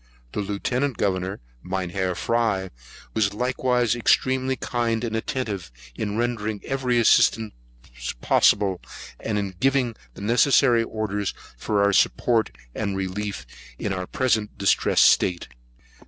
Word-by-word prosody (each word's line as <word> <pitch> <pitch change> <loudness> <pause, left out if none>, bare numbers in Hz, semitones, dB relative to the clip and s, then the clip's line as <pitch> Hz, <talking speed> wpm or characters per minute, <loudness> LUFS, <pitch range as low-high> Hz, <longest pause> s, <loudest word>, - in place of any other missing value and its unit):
The - - -4
Lieutenant 120 +6 -1
Governor, 95 -3 -1 0.2
Mynheer 95 +1 -2
Fry, 110 -5 0 0.4
was 105 -2 +1
likewise 125 0 +1
extremely 130 +2 +2
kind 120 -2 -1
and 115 -2 -2
attentive, 110 - -3 0.2
in 105 - -3
rendering 110 -3 -1
every 130 -3 0
assistance 110 -1 +4 0.7
possible, 95 +7 +3 0.4
and 110 -2 -2
in 100 -2 -2
giving 130 -2 +1 0.2
the - - -10
necessary 120 +2 +4
orders 105 -3 -3 0.2
for 100 - 0
our 100 0 +3
support 115 +3 +2 0.2
and 100 -2 -2
relief 95 +2 -4 0.3
in 100 - -2
our 90 -1 -4
present 115 -5 0
distressed 100 - +3
state. 90 -1 +3
110 Hz, 120 wpm, -24 LUFS, 100-120 Hz, 0.7 s, assistance